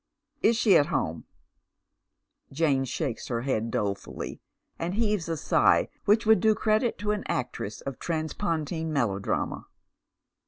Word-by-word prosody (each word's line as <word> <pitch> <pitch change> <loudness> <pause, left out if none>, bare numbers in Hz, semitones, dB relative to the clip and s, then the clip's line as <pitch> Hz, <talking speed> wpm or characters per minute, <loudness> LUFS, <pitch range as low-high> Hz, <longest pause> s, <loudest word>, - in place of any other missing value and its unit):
" 300 - -58
Is 225 +1 +4
she 215 -5 +5
at 145 - +3
home? 80 - -2 0.6
" - - -51
Jane 135 -2 +1
shakes 130 -1 -3
her 120 -2 -2
head 115 -3 -1
dolefully, 100 -3 -3 0.4
and 175 +3 -2
heaves 210 -6 0
a 165 - -1
sigh - - +3 0.2
which 220 +3 +4
would 220 0 +6
do 220 -1 +4
credit 220 +2 +1
to 210 0 -1
an 210 -1 -2
actress 120 -4 -3
of 135 -2 -6
transpontine 160 -1 -2
melodrama. 105 -9 -1
160 Hz, 145 wpm, -27 LUFS, 130-210 Hz, 0.6 s, would